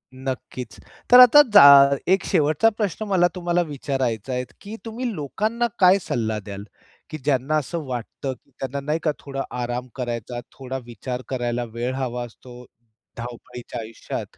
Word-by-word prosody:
नक्कीच. 130 -1 -6 0.3
तर 250 - +10
आता 250 +4 +10
जा 205 - +10 0.5
एक 190 - +3
शेवटचा 155 +8 +3
प्रश्न 210 0 -2
मला 185 -3 +3
तुम्हाला 175 -1 0
विचारायचा 135 - -3
आहे, 125 0 -1 0.2
की 210 +2 -8
तुम्ही 235 +2 -4
लोकांना 215 - -1
काय 190 +1 +6
सल्ला 110 -6 -2
द्याल? 100 -1 -8 0.5
की 155 - -5
ज्यांना 140 +1 0
असं 155 +3 -3
वाटतं 130 +1 -5
की - - -31
त्यांना 135 +1 -3
नाही 150 +3 -2
का 155 - +2
थोडा 135 -1 -5 0.2
आराम 120 +1 -3
करायचा, 120 -1 -4
थोडा 130 -1 -6
विचार 125 +2 -6
करायला 120 -2 -2
वेळ 120 +2 -2
हवा 125 -2 -3
असतो 125 +1 -13 0.5
धावपळीच्या 120 0 -8
आयुष्यात, 110 +1 -7
130 Hz, 150 wpm, -23 LUFS, 120-170 Hz, 0.5 s, तर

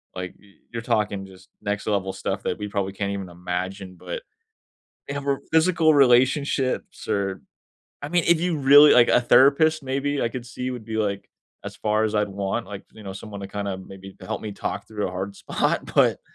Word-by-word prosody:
like, 90 -1 -6
y 100 -1 -21 0.2
you're 115 - -3
talking 105 -3 0
just 95 -1 -16
next 105 0 -3
level 95 -2 0
stuff - - -3
that - - -2
we 105 - -4
probably 100 -2 -2
can't 100 0 -2
even 100 -2 -5
imagine. 90 +2 -5
But - - -6 0.9
they 140 - -4
have 140 - -4
more 140 -1 0
physical 160 -1 +4
relationships 130 0 +2
or 100 -2 -1 0.6
I 145 - -4
mean, 175 0 +2
if 170 -1 +5
you 175 -2 0
really 145 +2 +8
like, 120 -1 +6
a - - +5
therapist 145 +5 +5
maybe, 140 +2 -1
I 115 - +1
could 120 0 -6
see, 125 +1 -5
would 120 -4 -7
be, 110 -1 -4
like, 100 -2 -2 0.4
as - - -7
far 110 0 +1
as 110 0 0
I'd 105 -1 +2
want, 100 +4 -3
like, 100 -1 -8
you 110 - -13
know, 95 -1 -6
someone 100 +1 -8
to 100 - -6
kinda 100 -1 -4
maybe 95 0 -11
help 95 - -4
me 110 - -5
talk - - -4
through 105 -2 -3
a - - -6
hard 95 +2 -5
spot. - - -1
But, - - +4
105 Hz, 205 wpm, -24 LUFS, 95-135 Hz, 0.9 s, really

